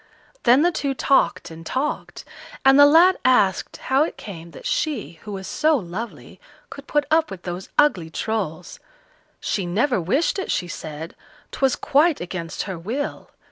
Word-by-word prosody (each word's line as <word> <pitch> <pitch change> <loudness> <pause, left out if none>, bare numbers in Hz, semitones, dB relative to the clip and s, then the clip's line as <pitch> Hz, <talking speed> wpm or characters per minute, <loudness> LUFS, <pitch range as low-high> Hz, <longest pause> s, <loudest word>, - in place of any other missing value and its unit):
Then 255 +5 +6
the 350 - +3
two 280 -4 -2
talked 270 -9 +1
and 165 0 -10
talked, 265 - -3 0.4
and 270 +1 +7
the 285 - +9
lad 340 +5 +6
asked 205 -8 +2
how 265 +1 +1
it 315 - -1
came 170 -5 -9
that - - -13
she, 290 - -2
who 210 - -9
was 190 -1 -6
so 310 +7 +2
lovely, 210 +3 -7 0.3
could 280 0 -10
put 295 -1 +1
up 320 0 +3
with 185 -2 -9
those 180 +1 -6
ugly 190 - +3
Trolls. 180 -3 -4 0.6
She 195 -4 -2
never 220 +4 +1
wished 275 - 0
it, 380 - -4
she 180 -1 -1
said; 155 0 -7 0.4
'twas 270 -2 +1
quite 300 +2 +2
against 175 -2 -5
her 190 -4 -6
will. 245 - -4
235 Hz, 165 wpm, -22 LUFS, 175-290 Hz, 0.6 s, the